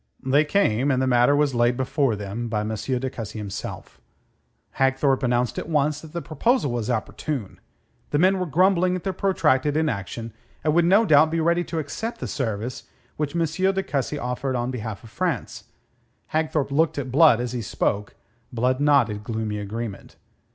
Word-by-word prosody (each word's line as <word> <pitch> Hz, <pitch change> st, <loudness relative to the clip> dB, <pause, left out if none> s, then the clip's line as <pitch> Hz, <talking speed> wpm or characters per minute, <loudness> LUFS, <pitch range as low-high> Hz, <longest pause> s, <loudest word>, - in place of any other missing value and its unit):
They 140 Hz, +4 st, +4 dB
came 145 Hz, -, +2 dB
and 130 Hz, -2 st, +2 dB
the 130 Hz, -, +1 dB
matter 125 Hz, +2 st, +4 dB
was 145 Hz, -2 st, +2 dB
laid 120 Hz, 0 st, +2 dB
before 130 Hz, -2 st, +1 dB
them 105 Hz, +3 st, -5 dB
by 110 Hz, -2 st, -1 dB
M. 110 Hz, +1 st, -3 dB
de 130 Hz, +4 st, -2 dB
Cussy 115 Hz, -4 st, -6 dB
himself. 100 Hz, -2 st, -7 dB, 0.8 s
Hagthorpe 135 Hz, 0 st, +2 dB
announced 125 Hz, -2 st, 0 dB
at -, -, -7 dB
once 150 Hz, -1 st, +1 dB
that 160 Hz, -, -12 dB
the 170 Hz, 0 st, -5 dB
proposal 165 Hz, -, +1 dB
was 120 Hz, -1 st, -2 dB
opportune. 120 Hz, 0 st, -3 dB, 0.5 s
The 145 Hz, -, 0 dB
men 185 Hz, +4 st, +3 dB
were 180 Hz, -, -2 dB
grumbling 180 Hz, +3 st, +3 dB
at 180 Hz, -, -5 dB
their 190 Hz, -, -2 dB
protracted 155 Hz, -7 st, +1 dB
inaction, 115 Hz, -, -2 dB, 0.3 s
and 155 Hz, -, +2 dB
would 170 Hz, +1 st, +4 dB
no 200 Hz, +6 st, +5 dB
doubt 155 Hz, -3 st, +5 dB
be 165 Hz, +1 st, -1 dB
ready 170 Hz, +2 st, +2 dB
to 165 Hz, -, -5 dB
accept 220 Hz, +10 st, -4 dB
the -, -, -4 dB
service 115 Hz, -2 st, -3 dB, 0.3 s
which 150 Hz, +1 st, -2 dB
M. 170 Hz, -1 st, +2 dB
de 190 Hz, +4 st, 0 dB
Cussy 145 Hz, -1 st, -2 dB
offered 125 Hz, 0 st, -2 dB
on 120 Hz, +1 st, -1 dB
behalf 110 Hz, -4 st, -6 dB
of 115 Hz, -, -13 dB
France. 170 Hz, -1 st, -3 dB, 0.7 s
Hagthorpe 155 Hz, -3 st, 0 dB
looked 155 Hz, +2 st, +2 dB
at 135 Hz, -3 st, -3 dB
Blood 145 Hz, -3 st, +6 dB
as 120 Hz, -1 st, -2 dB
he 125 Hz, -1 st, -3 dB
spoke. 105 Hz, -1 st, -2 dB, 0.4 s
Blood 125 Hz, +2 st, 0 dB
nodded 125 Hz, -8 st, +3 dB
gloomy 110 Hz, -1 st, -3 dB
agreement. 105 Hz, +1 st, -6 dB
135 Hz, 180 wpm, -24 LUFS, 120-160 Hz, 0.8 s, Blood